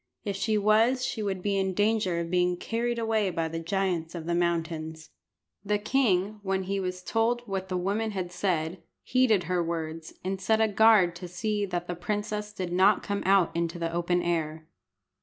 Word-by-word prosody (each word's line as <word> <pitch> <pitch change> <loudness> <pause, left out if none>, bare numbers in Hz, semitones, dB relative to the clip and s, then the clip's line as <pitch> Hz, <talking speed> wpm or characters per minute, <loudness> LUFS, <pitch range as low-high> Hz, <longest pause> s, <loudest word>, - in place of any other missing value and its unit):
If 200 -2 -2
she 215 +2 0
was 225 +5 +3
she 225 - -3
would 190 -3 -2
be 200 -1 +1
in 190 -1 -1
danger 205 -4 +1
of 170 0 -4
being 180 0 +2
carried 235 +4 -2
away 220 -3 +1
by 165 -2 -1
the 165 +1 -4
giants 175 -2 -1
of 165 -2 -6
the 170 - -1
mountains. 160 -2 -2 0.5
The 210 +1 +1
king, 210 -3 +1
when 190 -1 -1
he 195 +1 -2
was 180 -1 -4
told 235 +3 0
what 190 -1 -3
the 185 - -1
woman 205 +5 -1
had 185 -4 -4
said, 175 -2 -1 0.2
heeded 250 -7 +3
her 180 +1 0
words, 165 -1 -4
and 190 +1 -3
set 220 +3 +2
a 220 - +4
guard 210 -4 +5
to 180 - -7
see 205 +4 -2
that 175 -1 -3
the 175 - -3
princess 210 +3 -3
did 185 -4 -4
not 190 +3 +4
come 200 0 -2
out 195 -4 +4
into 170 +1 -1
the 165 -1 -3
open 175 +1 0
air. 160 -2 -2
190 Hz, 195 wpm, -28 LUFS, 175-210 Hz, 0.5 s, guard